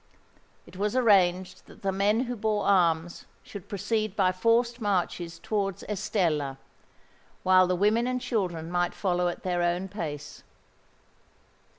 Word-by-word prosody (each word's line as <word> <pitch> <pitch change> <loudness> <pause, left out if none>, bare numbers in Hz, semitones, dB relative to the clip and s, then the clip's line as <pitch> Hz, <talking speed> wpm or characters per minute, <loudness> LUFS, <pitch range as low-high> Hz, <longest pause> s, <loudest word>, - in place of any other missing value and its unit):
It - - -14
was 210 +3 -1
arranged 190 -7 +2
that - - -17
the 195 - +1
men 205 +4 +2
who 245 -1 -3
bore 215 -1 -1
arms 170 -3 +2 0.2
should 200 -4 -10
proceed 215 +1 -2
by 190 -3 +3
forced 235 +5 +1
marches 180 -4 -1
towards 200 -3 -2
Estella; 175 -10 -1 0.9
while 185 0 +5
the 180 - +1
women 215 +6 +2
and 255 0 -1
children 175 -9 -2
might 175 0 0
follow 180 -2 0
at 175 - -4
their 180 -1 -1
own 175 +2 0
pace. 150 -7 -6
190 Hz, 135 wpm, -27 LUFS, 175-210 Hz, 0.9 s, while